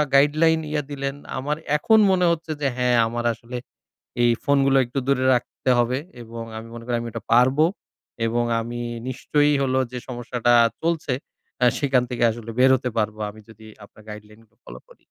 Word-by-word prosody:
guideline 155 +3 +4
ইয়ে 150 -1 -1
দিলেন; 140 -1 -3 0.2
আমার 145 +3 -2 0.2
এখন 220 +8 +4
মনে 180 -1 +2
হচ্ছে 165 -1 -3
যে 140 - +2
হ্যাঁ, 125 -1 +2
আমার 120 +1 -4
আসলে 120 +2 -8 0.7
এই 120 0 +4
ফোনগুলো 135 -1 +3
একটু 120 +3 -5
দূরে 130 -2 +2
রাখতে 125 +1 -2
হবে 120 +2 +1 0.2
এবং 115 0 -8 0.2
আমি 115 +1 -10
মনে 115 - -9
করি 120 -1 0
আমি 120 - -5
ওইটা 115 -1 -7
পারবো। 130 +5 +4 0.6
এবং 120 +1 0 0.2
আমি 120 +1 -5 0.3
নিশ্চয়ই 145 +3 +1
হলো 130 -1 +1
যে 125 - -4
সমস্যাটা 120 -1 0 0.3
চলছে, 165 -4 -1 0.5
আ - - +6
সেখান 135 -3 +2
থেকে 120 -1 -3
আসলে 115 0 -7
বের 130 +1 +6
হতে 125 0 -4
পারবো 110 0 -1
আমি 110 - -14
যদি 110 0 -15 0.2
আপনার 105 - -18
guideline 105 +1 -11
গুলো 110 +2 -39
ফলো - - -10
করি। - - -18
125 Hz, 180 wpm, -23 LUFS, 115-140 Hz, 0.7 s, আ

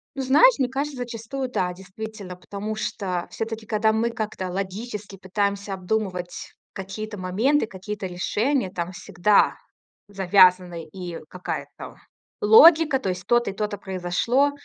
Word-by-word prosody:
Ну 270 - -2
знаешь, 375 - +6
мне 260 - +1
кажется, 275 +1 -3
зачастую 245 +2 -5
да, 180 -6 0
действительно, 190 +1 -8
потому 200 +4 -6
что 195 -5 -3
всё-таки, 225 0 -5
кода 220 0 +2
мы 225 +2 +1
как-то 215 -5 -4
логически 200 +2 -5
пытаемся 200 +1 -2
обдумывать 185 -2 -3 0.2
какие-то 205 +3 -6
моменты, 225 +9 +1
какие-то 195 0 -6
решения, 205 +6 0
там 175 -2 -4
всегда 200 +2 +2 0.5
завязаны 185 -3 +4
и 175 -2 -6
какая-то 185 0 -6 0.5
логика, 305 +6 +7
то 225 - -2
есть 180 0 -4
то-то 240 -3 +3
и - - -10
то-то 210 0 -3
произошло, 190 +9 0
205 Hz, 130 wpm, -24 LUFS, 185-230 Hz, 0.5 s, логика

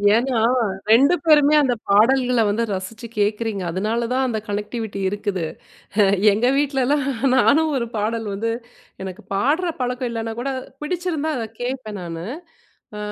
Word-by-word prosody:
ஏன்னா, 245 +1 +1 0.5
2 275 +10 +6
பேருமே 300 -2 +6
அந்த 260 -4 +2 0.2
பாடல்கள 245 +4 +4
வந்து 215 +3 0
ரசிச்சி 200 +5 -6
கேக்குறீங்க. 210 -1 0
அதனால 215 +6 -1
தான் 260 +1 +1
அந்த 220 -3 -1
கனெக்டிவிட்டி 210 0 -4
இருக்குது. 200 -3 -3 0.9
எங்க 220 +4 +1
வீட்லலாம் 280 0 +1 0.3
நானும் 310 +5 +4
ஒரு 235 - -1
பாடல் 220 +1 -1
வந்து 230 +3 -1 0.5
எனக்கு 190 -1 -7
பாடுற 295 - +1
பழக்கம் 250 0 -1
இல்லைனா 225 -1 -3
கூட 275 - -2 0.3
பிடிச்சிருந்தா 320 -1 -2
அத 235 - -2 0.2
கேட்பேன் 245 -5 -4
நானு. 165 -1 -6 0.7
அ - - -6
235 Hz, 135 wpm, -21 LUFS, 210-270 Hz, 0.9 s, 2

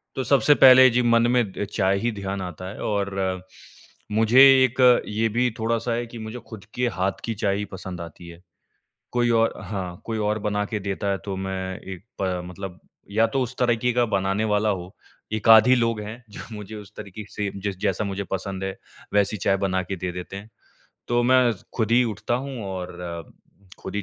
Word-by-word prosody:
तो 130 - -1
सबसे 145 +1 +4
पहले 130 -1 +8
जी 120 +1 +2
मन 115 0 +4
में 125 -1 +4
अ, - - -3
चाय 100 -1 +1
ही 120 +2 0
ध्यान 100 -2 -4
आता 90 0 -6
है 100 - -9
और 100 -2 -1 1.0
मुझे 110 +4 +4 0.2
एक 130 +1 +1 0.3
ये 110 +2 0
भी 125 +3 +1
थोड़ा-सा 115 +1 0
है 120 +1 -2
कि 115 0 -10
मुझे 110 +2 -6
ख़ुद 105 -4 -10
के 125 0 +1
हाथ 95 +1 -1
की 115 - -2
चाय 100 -2 0
ही 105 - -3
पसंद 95 -2 -7
आती 85 +1 -10
है। 85 +1 -13 0.7
कोई 120 -1 +1
और 115 -1 +3
हाँ, 90 -3 -5
कोई 115 -1 -3
और 105 0 0
बना 105 0 -1
के 105 +1 -3
देता 100 +1 -3
है 95 - 0
तो 100 -2 -3
मैं 95 0 -4
एक 95 -1 -9 0.2
प 90 -2 -1
मतलब 90 0 -8 0.3
या 110 +2 +3
तो 135 -1 -1
उस 125 +1 -6
तरीक़े 125 0 +2
का 120 0 +3
बनाने 95 +2 0
वाला 105 +1 +1
हो। 95 -1 -4 0.4
एक-आध 110 +1 +6
ही 130 - +6
लोग 115 -3 +1
हैं 110 +4 -8
जो - - -8
मुझे 105 +1 -8
उस 105 -1 -10
तरीक़े 100 +2 -8
से 100 -2 -3
जिस 100 -2 -2
जैसा 95 +2 0
मुझे 100 0 -3
पसंद 95 0 -3
है, 95 0 -4 0.4
वैसी 105 +1 +2
चाय 95 +2 +1
बना 95 -1 0
के 95 +2 -4
दे 90 +1 -3
देते 90 +2 -7
हैं। 105 +3 -10 0.6
तो 120 0 +2
मैं 125 -1 +4 0.3
ख़ुद 110 -2 +1
ही 125 +1 +6
उठता 115 +1 -2
हूँ 135 +1 -4
और 90 -1 -5 0.9
ख़ुद - - -7
ही 105 - -1
105 Hz, 205 wpm, -24 LUFS, 95-115 Hz, 1.0 s, पहले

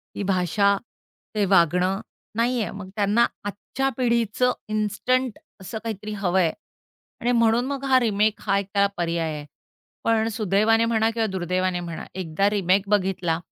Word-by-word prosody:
ती - - -3
भाषा, 195 +1 +2 0.6
ते 210 -1 +2
वागणं 185 +1 +3 0.3
नाहीये. 230 -3 +1
मग 195 -2 -8
त्यांना 210 +3 +3 0.2
आजच्या 205 +6 -2
पिढीचं 235 0 +2 0.2
इन्स्टंट 215 +4 0 0.2
असं 190 +4 -6
काहीतरी 215 -1 -5
हवं 190 -2 +1
आहे 165 -3 +3 0.7
आणि 240 - +1
म्हणून 230 0 +3
मग 275 0 -4
हा 260 -1 +5
रिमेक 215 -2 +1
हा 200 -1 +1
एक 200 - -5
त्याला 200 -1 +4
पर्याय 170 -2 -1
आहे. 150 -1 -6 0.6
पण 225 -1 +2
सुदैवाने 220 +1 +2
म्हणा 225 -1 +2
किंवा 225 -1 0
दुर्दैवाने 185 -1 -1
म्हणा, 170 -2 -6
एकदा 185 +2 0
रिमेक 195 -1 +1
बघितला 185 -5 +1
205 Hz, 145 wpm, -24 LUFS, 185-225 Hz, 0.7 s, हा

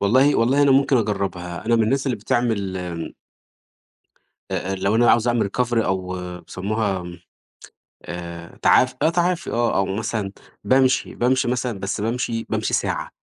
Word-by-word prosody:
والله 130 +8 +4
والله 130 +5 +3
أنا 140 - +4
ممكن 135 0 +4
أجرّبها 95 -5 -2
أنا 115 0 +3
من 115 - +3
الناس 135 +5 0
اللي 130 - 0
بتعمل 105 -3 -1 1.7
أ 95 - -2
أ - - 0
لو 100 +2 0
أنا - - +3
اللي 120 - +6
عاوز 120 0 +3
أعمل 120 -3 +2
recovery 120 -1 +1
أو 95 -1 -2 0.2
بيسموها 95 +1 -2 1.0
آآ 85 -1 -8
تعاف 130 0 +4
آه - - +4
تعافي 175 +1 0
آه 120 0 +1
أو 95 - +2
مثلًا، 105 0 -3 0.3
بامشي، 130 0 +2
بامشي 125 +1 +1
مثلًا 125 -3 -2
بس 100 +2 -3
بامشي 115 0 -2
بامشي - - -1
ساعة، - - -1
115 Hz, 155 wpm, -22 LUFS, 95-125 Hz, 1.7 s, اللي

